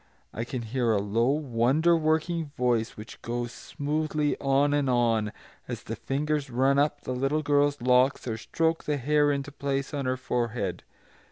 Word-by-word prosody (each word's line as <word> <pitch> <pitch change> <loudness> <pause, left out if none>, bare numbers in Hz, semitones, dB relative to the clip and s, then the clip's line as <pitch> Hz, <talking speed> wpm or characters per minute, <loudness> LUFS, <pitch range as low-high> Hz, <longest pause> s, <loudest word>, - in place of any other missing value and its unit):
I 115 - -3
can 120 0 -4
hear 120 +1 0
a - - +2
low, 110 +5 +1
wonder 145 +3 +2
working 160 +1 0
voice 120 -3 0
which 105 +2 -10
goes 120 0 -3
smoothly 150 +1 -2
on 140 +1 +2
and 145 -2 +1
on, 115 -3 +2 0.4
as - - -5
the - - -5
fingers 145 +1 -2
run 135 +3 +2
up 145 0 +1
the 130 - -4
little 135 +4 0
girl's 145 0 +2
locks 125 +2 +3
or 115 - -1
stroke 165 +8 -1
the 150 -1 0
hair 145 +2 +3
into 140 0 -3
place 140 0 -3
on 140 -2 -2
her 130 0 0
forehead. 120 -7 -2
135 Hz, 170 wpm, -27 LUFS, 120-145 Hz, 0.4 s, locks